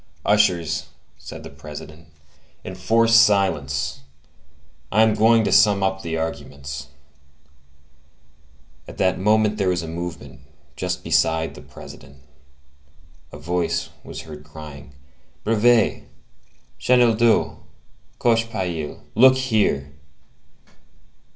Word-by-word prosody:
"Ushers," 90 -6 +1 0.3
said - - -10
the - - -10
President, 75 +1 -11 0.6
"enforce 115 0 +1
silence! 75 -10 +2 0.9
I 110 +2 +4
am 110 -1 +3
going 110 +1 +4
to - - -1
sum 105 -2 +4
up 95 0 -1
the 80 -2 -4
arguments." 70 -3 -6 2.0
At - - -11
that 95 0 +1
moment 105 +1 +2
there 95 -2 +1
was 90 -2 -1
a - - -7
movement 85 -6 -7 0.4
just 90 +2 -3
beside 80 -1 +1
the - - -12
President; 70 +1 -13 1.1
a - - -10
voice 85 0 -2
was - - -8
heard 75 -2 -11
crying:— 75 -2 -12 0.5
"Brevet! 115 +1 +2 0.7
Chenildieu! 120 -2 +3 0.6
Cochepaille! 110 -10 -1
look 130 +2 +6
here!" 110 - 0
90 Hz, 100 wpm, -22 LUFS, 75-110 Hz, 2.0 s, look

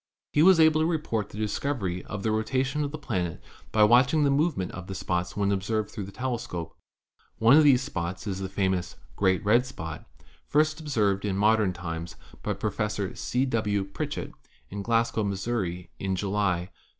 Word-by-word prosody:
He 150 - +4
was 185 0 +7
able 160 -1 +5
to 160 - +2
report 135 - -1
the - - -10
discovery 105 -4 -2
of 105 -1 -6
the 110 - +1
rotation 130 +6 0
of 145 - -2
the 155 - -6
planet 90 - -3 0.3
by 110 - +4
watching 125 +7 +5
the 140 - +3
movement 140 - +1
of 95 0 -8
the 95 - -5
spots 90 0 -2
when 100 -1 +1
observed 105 +2 -1
through 105 -4 -5
the 100 - -10
tele 125 +2 -2
scope. 85 -6 -6 0.6
One 115 +5 +6
of 155 - +7
these 135 -3 +5
spots 90 -1 -4
is 95 -3 -3
the 95 -1 -4
famous 95 -2 -1 0.2
"great 95 +1 +1
red 115 +4 +5
spot" 80 - -8 0.4
first 155 +1 +2
observed 105 -10 0
in 100 -2 -1
modern 105 -1 +3
times 85 -1 -6 0.3
by - - -1
Professor 105 -2 -2
C. 125 +2 -1
W. 105 -5 0
Pritchett 95 0 -5 0.4
in 100 +1 -4
Glasgow, 115 0 +1
Missouri, 100 -3 -2
in 95 -1 -1
July, 95 -2 -1
1878. - - -37
105 Hz, 185 wpm, -27 LUFS, 95-130 Hz, 0.6 s, was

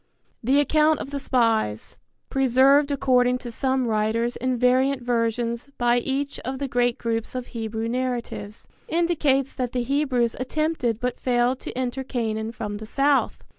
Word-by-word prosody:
The 265 +5 +3
account 305 +2 +3
of 275 - -6
the 285 - -3
spies, 225 - 0 0.3
preserved 270 +2 +4
according 250 -3 +2
to 245 -1 -8
some 260 +1 0
writers 225 +2 0
in 255 0 -1
variant 255 +2 +2
versions 235 +1 -1
by 240 0 +3
each 275 +3 -3
of 265 +1 -4
the 280 +1 -3
great 245 -1 +1
groups 230 +1 -3
of 250 -1 -3
Hebrew 225 -1 -3
narratives, 240 -4 -4 0.2
indicates 310 - +1
that 250 -3 -3
the 250 -1 0
Hebrews 255 -3 +1
attempted 260 -4 -1
but 250 0 -2
failed 245 +1 +1
to - - -7
enter 260 +1 -2
Canaan 225 -4 -2
from 210 -3 -5
the 215 +1 -9
south. 275 +4 +1
250 Hz, 155 wpm, -24 LUFS, 230-270 Hz, 0.3 s, preserved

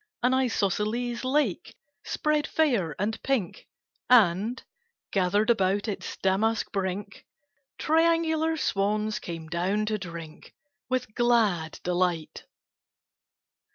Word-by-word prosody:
An 250 +1 +3
isosceles 235 -1 0
lake 260 - 0 0.3
spread 305 -1 0
fair 230 - +1
and 220 +3 -2
pink, 255 -10 -2 0.4
And, 220 0 +4 0.5
gathered 205 +4 +2
about 200 -1 +1
its 205 - -5
damask 210 +4 +1
brink, 195 0 -4 0.5
Triangular 325 0 +2
swans 210 -3 0
came 165 -2 -7
down 185 +6 0
to 215 0 -1
drink 170 -4 -9 0.3
With 255 -4 -2
glad 215 -10 +1
delight. 175 -2 -1
210 Hz, 95 wpm, -27 LUFS, 185-250 Hz, 0.5 s, And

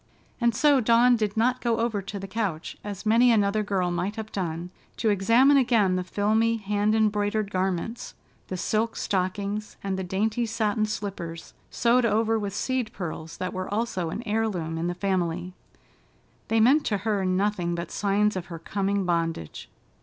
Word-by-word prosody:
And 235 -2 +2
so 290 +2 +4
Dawn 235 +2 +5
did 215 -2 -2
not 250 +3 +2
go 235 -2 +1
over 225 -3 0
to 200 +1 -6
the 195 0 -6
couch, 190 -6 -3
as 205 0 -6
many 235 +3 +5
another 210 -1 +2
girl 190 -4 0
might 180 +4 -2
have 220 -1 -6
done, 175 -2 -4 0.3
to 225 - +1
examine 230 +8 +5
again 230 -8 +3
the 185 - -1
filmy 220 +4 +1
hand 210 0 0
embroidered 210 -1 +1
garments, 190 +4 -2 0.3
the 185 - -4
silk 220 +4 0
stockings, 200 +2 -2
and 195 -1 -2
the - - -2
dainty 215 +6 -1
satin 215 -1 0
slippers, 190 -6 -6 0.2
sewed 245 +1 +2
over 225 0 +2
with 200 -1 -4
seed 255 -1 -1
pearls 165 -3 -6
that 185 - -3
were 185 +1 -4
also 205 -6 -1
an 220 - -5
heirloom 205 -8 -1
in 170 - -1
the 175 - -2
family. 180 -2 -1 0.9
They 225 - +2
meant 270 +7 +5
to 205 - +1
her 210 -3 +1
nothing 185 -2 0
but 170 0 -5
signs 210 +1 +1
of 185 -1 -4
her 170 -2 -7
coming 200 +3 -1
bondage. 165 - -2
205 Hz, 170 wpm, -26 LUFS, 185-225 Hz, 0.9 s, Dawn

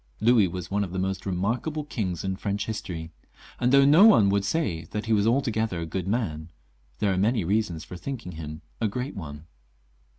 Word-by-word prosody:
Louis 110 -2 +5
was 90 +1 -6
one 100 +1 +1
of 90 -3 -6
the - - -3
most 95 +1 -2
remarkable 115 - -1
kings 95 - -3
in 95 0 -1
French 100 +1 -2
history; 85 -7 -5 0.5
and 125 +1 +2
though 140 0 +6
no 155 +7 +7
one 110 - +7
would 100 0 +1
say 95 - -1
that 105 +6 -5
he 115 - +1
was 105 0 +3
altogether 115 -6 +1
a 85 - -3
good 90 +3 -4
man, 85 -8 -2 0.5
there 100 -2 +1
are - - -1
many 110 +1 +2
reasons 95 -3 0
for 90 - -9
thinking 115 0 -6
him 75 -1 -8 0.2
a 110 - +2
great 125 +7 -4
one. 75 -5 -8
100 Hz, 200 wpm, -26 LUFS, 90-115 Hz, 0.5 s, no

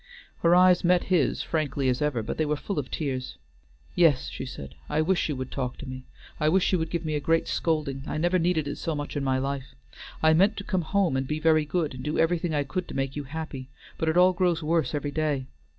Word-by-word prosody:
Her 170 +1 +4
eyes 180 0 +5
met 180 0 +4
his 155 -8 +2
frankly 145 -4 -1
as 125 +1 +1
ever, 145 -6 0
but - - -4
they 155 - +2
were 150 - +1
full 170 +3 -3
of 135 - -5
tears. 130 - -3 0.6
"Yes," 160 -7 +3
she 130 - -6
said; 70 - -8 0.2
"I 150 - 0
wish 180 0 +1
you 150 - -1
would 130 -1 -5
talk 125 -2 -3
to - - -8
me. 130 0 -7 0.3
I 150 - +3
wish 185 +3 +3
you 185 - +3
would 160 0 -2
give 170 -1 -3
me 155 - -1
a 150 - 0
great 165 +3 +1
scolding. 150 -5 -1
I - - -3
never 175 +3 +2
needed 165 -3 +1
it 145 - -4
so 165 - -2
much 145 +1 -5
in 145 - -1
my 130 -1 +1
life. 135 - -4 0.5
I 160 0 +6
meant 195 +6 +3
to 200 - -4
come 185 -2 -1
home 175 -3 +1
and 135 0 -1
be 150 +2 -2
very 155 -1 +3
good, 155 -1 -1
and 130 0 -8
do 150 +2 -2
everything 170 +1 +1
I 145 - +1
could 175 +7 -4
to - - -8
make 135 0 -2
you 145 -1 -4
happy, 140 -3 -6 0.3
but 160 - +1
it 160 - +1
all 180 +1 +6
grows 175 -2 +1
worse 160 0 +1
every 145 0 -2
day. 145 -3 -1
155 Hz, 250 wpm, -26 LUFS, 135-170 Hz, 0.6 s, I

